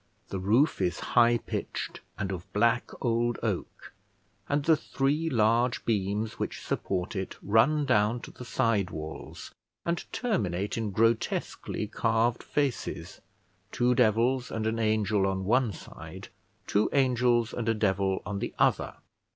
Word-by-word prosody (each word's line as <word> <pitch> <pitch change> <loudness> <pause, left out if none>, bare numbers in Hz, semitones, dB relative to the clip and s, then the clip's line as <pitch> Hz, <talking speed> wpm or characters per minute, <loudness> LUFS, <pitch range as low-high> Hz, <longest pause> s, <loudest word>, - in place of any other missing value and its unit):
The 95 - -3
roof 110 +8 +2
is 90 -1 0
high 120 -1 +6
pitched, - - -5 0.2
and 95 -1 -2
of 90 -2 -6
black 120 +3 +2 0.2
old 120 0 +1
oak, - - -4 0.6
and 145 0 +1
the 160 - +6
three 150 +3 0
large 115 0 +2
beams 105 0 -1
which - - -4
support 90 0 -2
it 95 -1 -3
run 130 +9 +3
down 110 -2 +2
to - - -9
the - - -10
side 115 -6 +1
walls, 80 -1 -7 0.3
and 170 0 -1
terminate 100 - -1
in 115 -2 -2
grotesquely 115 +3 0
carved 115 +1 +1
faces, 140 -4 -2 0.5
two 125 0 +2
devils 125 +2 +2
and 110 -1 -3
an 110 +1 0
angel 110 -2 +2
on 95 0 -2
one 120 +2 +3
side, 85 - -10 0.4
two 105 +1 +2
angels 125 -3 +2
and 115 -2 -2
a 115 - +2
devil 95 -2 +1
on 100 -1 -3
the - - -4
other. - - +2
115 Hz, 145 wpm, -28 LUFS, 100-125 Hz, 0.6 s, high